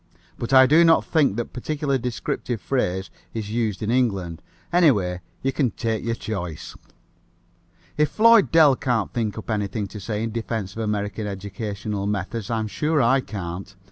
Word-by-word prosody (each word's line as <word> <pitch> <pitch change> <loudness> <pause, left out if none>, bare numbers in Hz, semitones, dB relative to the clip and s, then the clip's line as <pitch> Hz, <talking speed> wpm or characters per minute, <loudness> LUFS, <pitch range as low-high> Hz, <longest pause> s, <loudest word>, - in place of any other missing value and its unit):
But 120 - -4
I 130 -1 +8
do 155 +6 +6
not 165 -1 +5
think 145 - +2
that 120 0 -4
particular 140 +1 -1
descriptive 120 -1 -3
phrase 95 -8 -1 0.2
is 105 -2 -4
used 110 -3 -1
in 105 - 0
England. 100 -10 0 0.3
Anyway, 105 - +3 0.2
you 135 0 0
can 135 -3 +1
take 110 -1 -2
your 115 0 -1
choice." 90 -9 -5 1.2
If 150 0 +3
Floyd 230 -2 +5
Dell 155 -4 +6
can't 120 -6 -1
think 110 -3 -2
up 110 - -5
anything 105 0 -1
to 105 - -8
say 105 +3 -3
in 115 - -2
defense 110 -3 -3
of - - -6
American 105 -1 -2
educational 100 +1 -4
methods 105 +1 -3
I'm 110 -2 -1
sure 150 - 0
I 130 +2 +4
can't. 95 -3 -6
110 Hz, 165 wpm, -23 LUFS, 100-130 Hz, 1.2 s, I